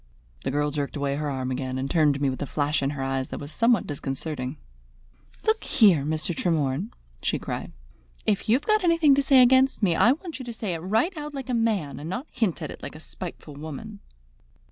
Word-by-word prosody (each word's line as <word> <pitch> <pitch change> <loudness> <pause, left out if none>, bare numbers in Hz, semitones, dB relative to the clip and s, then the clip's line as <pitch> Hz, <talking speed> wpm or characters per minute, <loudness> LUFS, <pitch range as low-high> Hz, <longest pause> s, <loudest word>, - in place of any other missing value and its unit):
The - - -1
girl 145 +2 0
jerked 145 0 -3
away 140 -1 -1
her 150 0 -2
arm 130 -2 -2
again, 130 0 -2
and 130 +1 -2
turned 150 -2 +3
to - - -4
me 140 -2 +1
with 130 - -6
a 145 - -2
flash 145 +1 0
in 135 - +1
her 140 -2 -3
eyes 135 0 -1
that - - -5
was 145 +1 -7
somewhat 230 +2 +3
disconcerting. 140 -1 -4 0.9
"Look 440 +1 +2
here, 195 - +5
Mr. 160 +3 -1
Tremorne," 155 +2 0 0.3
she - - 0
cried, - - -5 0.5
"if 210 0 0
you've 255 +6 +3
got 430 -2 +3
anything 330 -4 +5
to 280 - +4
say 270 -2 +6
against 260 -1 +4
me, 180 -4 +4
I 240 - +5
want 325 0 -8
you 260 - -6
to 240 - -5
say 215 -4 -3
it 165 - -3
right 220 - +1
out 300 -1 -6
like 265 -1 -6
a - - 0
man, 205 - 0
and 155 +3 -6
not 245 +10 -3
to - - -16
hint 180 -7 +1
at 150 - -4
it - - -10
like - - -7
a - - -9
spiteful 165 -2 -8
woman." 160 +9 -8
165 Hz, 230 wpm, -26 LUFS, -, 0.9 s, say